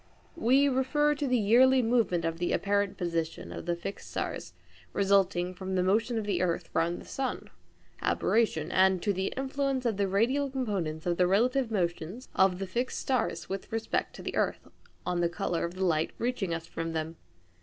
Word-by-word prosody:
We 275 -2 +4
refer 280 +3 +2
to 290 -1 -2
the 250 -1 +3
yearly 250 +4 +5
movement 225 -8 +2
of 165 0 -2
the 175 - 0
apparent 200 0 0
position 170 -2 -3
of - - -7
the 175 - +1
fixed 185 +3 -7
stars 85 - -4 0.4
resulting 190 -2 +2
from 190 +1 -4
the 180 - +2
motion 225 +5 +1
of 220 - -2
the 190 -4 0
earth 175 -2 -1
round 170 +2 +1
the - - -11
sun 270 -1 -4 0.5
(aberration), 185 -8 +1
and 190 0 +4
to 205 - +2
the 190 +1 -1
influence 270 -1 -1
of 225 -4 +1
the 200 -1 +1
radial 245 +9 +1
components 195 - -2
of 175 -1 0
the 180 - +4
relative 245 +6 +2
motions 180 +3 -2
of 190 -1 +3
the 195 - -3
fixed 240 +7 -2
stars 235 -10 -1
with 195 0 -5
respect 225 0 -2
to - - -9
the - - -4
earth - - -1 0.4
on 175 -1 0
the 170 - +2
colour 170 0 -1
of 170 +1 -6
the 190 0 0
light 160 -2 +1
reaching 235 -7 -1
us 165 0 -3
from 165 0 -4
them. 160 +1 -3
195 Hz, 190 wpm, -29 LUFS, 175-245 Hz, 0.5 s, yearly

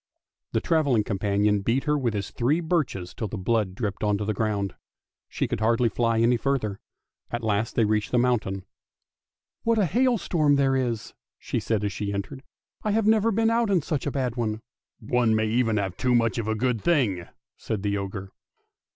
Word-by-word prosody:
The - - +1
travelling 145 -9 +2
companion 105 0 +1
beat 115 +6 +1
her 150 -1 +1
with 125 -6 0
his 100 -2 -3
three 135 +7 +1
birches 150 - -1
till 110 - -4
the 105 - -5
blood 100 -1 0
dripped 105 -2 -3
on 105 -1 +2
to 105 - -3
the 110 - 0
ground. 100 -3 -1 0.6
She - - -1
could - - -3
hardly 115 +2 +2
fly 115 0 +1
any 120 +1 +4
further. 115 -7 -1 0.5
At 120 0 -4
last 110 +1 0
they 115 - +3
reached 105 0 0
the 125 - +1
mountain. 110 -6 0 0.5
" - - -65
What 230 0 +2
a 205 - +3
hailstorm 180 - +2
there 135 -1 +2
is! 120 -5 -2
" - - -68
she - - -3
said 110 -3 -1
as 100 -2 -1
she 100 +1 -3
entered. 100 +7 -4 0.2
" - - -36
I 215 - 0
have 220 0 +2
never 220 +1 +4
been 225 +2 +2
out 230 -1 +2
in 185 -6 +2
such 150 -3 -2
a - - 0
bad 130 -4 -1
one! 110 -2 -2
" - - -68
" - - -62
One 115 0 +2
may 110 0 +2
even 115 0 +1
have 95 -3 -2
too 125 -1 +2
much 115 0 +2
of 110 - -3
a 110 - 0
good 115 -1 0
thing! 115 - +1
" - - -67
said 105 -3 -4
the 100 -1 0
ogre. 95 0 -6
115 Hz, 215 wpm, -26 LUFS, 105-140 Hz, 0.6 s, any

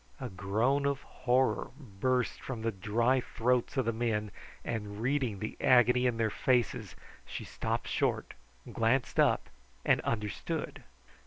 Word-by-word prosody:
A 130 -2 -4
groan 110 +9 +1
of 140 0 -1
horror 130 +1 +1
burst 125 +1 -1
from 120 -4 -5
the 115 - +1
dry 115 +6 +1
throats 125 +3 0
of 130 - +2
the 115 - +1
men, 110 -2 -1 0.3
and 105 -3 -4
reading 125 -3 0
the 110 +3 -5
agony 125 0 +5
in 120 -2 0
their 110 -2 +1
faces, 125 -2 0 0.3
she - - -5
stopped - - -3
short, - - 0 0.4
glanced 120 +3 +1
up, - - +3 0.4
and - - +4
understood. 105 -3 -3
120 Hz, 140 wpm, -31 LUFS, 110-130 Hz, 0.4 s, agony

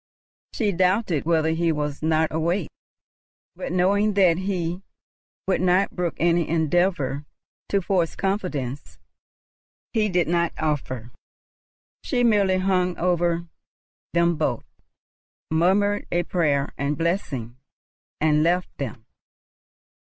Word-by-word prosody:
She 215 -4 0
doubted 185 -3 +1
whether 160 -1 +2
he 165 +1 +1
were 150 -1 -1
not 160 0 +1
awake; 170 +2 -1 0.8
but, - - -5
knowing 200 +3 +2
that 180 -4 +4
he 180 -2 -2 0.7
would 190 - +1
not 185 +2 +2
brook 175 -3 -1
any 170 0 +2
endeavour 160 -3 +1 0.5
to 200 -2 +1
force 175 -3 0
confidence 165 - -3 1.0
he 215 -2 +2
did 180 -2 +1
not 170 0 +1
offer, 130 -6 -2 0.9
she 245 -3 0
merely 200 -5 +3
hung 185 -1 +1
over 175 -1 +1 0.7
them 170 -1 +2
both, 155 - -1 0.9
murmured 195 +5 +2
a 175 0 +1
prayer 145 -6 0
and 140 +1 -1
blessing, 140 - -2 0.6
and 150 -1 +3
left 175 +3 +1
them. 115 -5 -5
170 Hz, 110 wpm, -24 LUFS, 155-185 Hz, 1.0 s, that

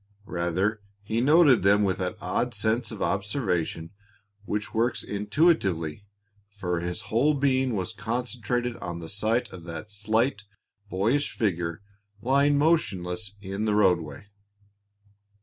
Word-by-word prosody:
Rather, 95 +4 -1 0.2
he 110 +3 -1
noted 145 -2 +6
them 100 +2 +4
with 95 -2 0
that 95 +3 -2
odd 120 +2 -1
sense 110 +2 0
of 110 -3 -4
observation 95 - -1 0.5
which 105 +1 -3
works 115 +3 +1
intuitively, 100 - +1 0.4
for 90 -4 -3
his 85 +1 -4
whole 145 +7 +4
being 130 -3 +2
was 95 -3 -3
concentrated 120 0 -2
on 85 -1 -5
the 85 -1 -7
sight 110 +6 0
of 90 - -9
that 85 +5 -7
slight, 105 +1 0 0.4
boyish 115 +11 +1
figure 85 -5 -1 0.4
lying 140 +4 +3
motionless 100 - 0
in 100 +2 -3
the 105 -1 +2
roadway. 90 -6 +2
105 Hz, 125 wpm, -27 LUFS, 90-120 Hz, 0.5 s, noted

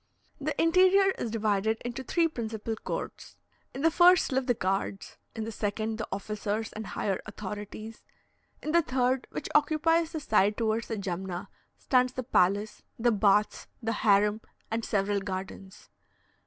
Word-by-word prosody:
The 290 +1 -3
interior 375 +4 +5
is 235 - -2
divided 220 0 0
into 245 +2 -4
three 335 +5 +2
principal 225 -6 -4
courts. - - -6 0.3
In 270 - -6
the 325 - +5
first 355 0 +5
live 260 0 0
the 245 - +3
guards; 195 0 -2 0.2
in 220 - -3
the 225 - -4
second, 215 +1 -2
the 220 - -3
officers 210 +2 -3
and 215 0 -6
higher 195 -2 -2
authorities; 210 +1 -7 0.6
in 305 - -2
the 340 +1 +5
third, 255 -2 0
which - - -5
occupies 320 +2 +3
the 315 - -2
side 210 -6 +2
towards 225 0 0
the 225 - -3
Jumna, 190 0 -4 0.3
stands 255 -1 +2
the 255 - -4
palace, 205 -2 +1 0.2
the 240 +1 +3
baths, 210 0 +2
the 225 -1 -2
harem, 210 0 +3 0.3
and 225 +1 -1
several 200 -1 0
gardens. 190 0 -7
220 Hz, 155 wpm, -29 LUFS, 205-260 Hz, 0.6 s, interior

